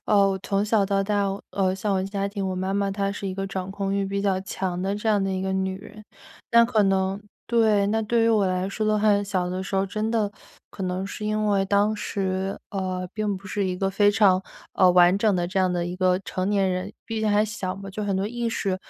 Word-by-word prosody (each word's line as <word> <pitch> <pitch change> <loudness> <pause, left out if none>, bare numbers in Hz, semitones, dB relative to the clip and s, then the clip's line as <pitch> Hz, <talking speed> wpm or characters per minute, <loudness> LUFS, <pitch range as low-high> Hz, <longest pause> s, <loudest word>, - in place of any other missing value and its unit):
呃， 210 - +3
我 190 - -1
从 200 +1 0
小 215 -1 +2
到 195 0 +1
大 205 0 0 0.2
呃， 190 -2 +1
像 195 +1 -1
我 190 - +1
家 195 +1 -2
庭 200 0 -4
我 185 - -3
妈 190 +1 -2
妈 200 0 0
她 195 0 -1
是 200 -1 -5
一 - - -3
个 195 0 -3
掌 190 -1 -4
控 195 0 -2
欲 200 0 0
比 200 +1 -2
较 195 -2 +1
强 190 -2 -3
的 195 +2 -1
这 215 +2 -2
样 205 -2 +3
的 195 - -1
一 190 - -2
个 190 0 -2
女 190 0 -1
人。 215 +1 -13 0.5
那 235 0 +7
可 230 -2 +2
能 195 0 +1 0.3
对， 220 -4 +3
那 220 +2 +1
对 225 +2 +2
于 230 - +4
我 215 -3 +3
来 185 0 -1
说 215 +2 -3
的 215 0 +2
话， 205 -1 +3
小 185 -3 -1
的 185 +1 -3
时 195 0 -3
候 195 +1 +1
真 215 +3 -2
的 215 -3 0 0.4
可 195 - -7
能 185 +1 -2
是 210 - -6
因 215 0 0
为 200 -2 +2
当 205 +2 +2
时， 190 -2 -2
呃， 185 -2 -3
并 210 -1 -1
不 190 +1 -12
是 200 +1 -1
一 185 -1 -1
个 195 +1 0
非 205 +1 +3
常， 200 -3 +4 0.3
呃， 185 -1 +5
完 180 +1 +6
整 205 -1 +2
的 175 -1 0
这 190 +2 0
样 185 -1 +2
的 175 -1 -1
一 175 - -4
个 185 0 +2
成 185 +1 -2
年 195 -2 +2
人。 185 +2 -3
毕 225 -1 -3
竟 215 -1 +1
还 205 +1 +3
小 200 -3 -4
嘛， 195 0 -8
就 210 +2 -5
很 200 -2 0
多 195 - 0
意 240 +1 -2
识 195 -4 -1
195 Hz, 275 characters per minute, -24 LUFS, 190-210 Hz, 0.5 s, 那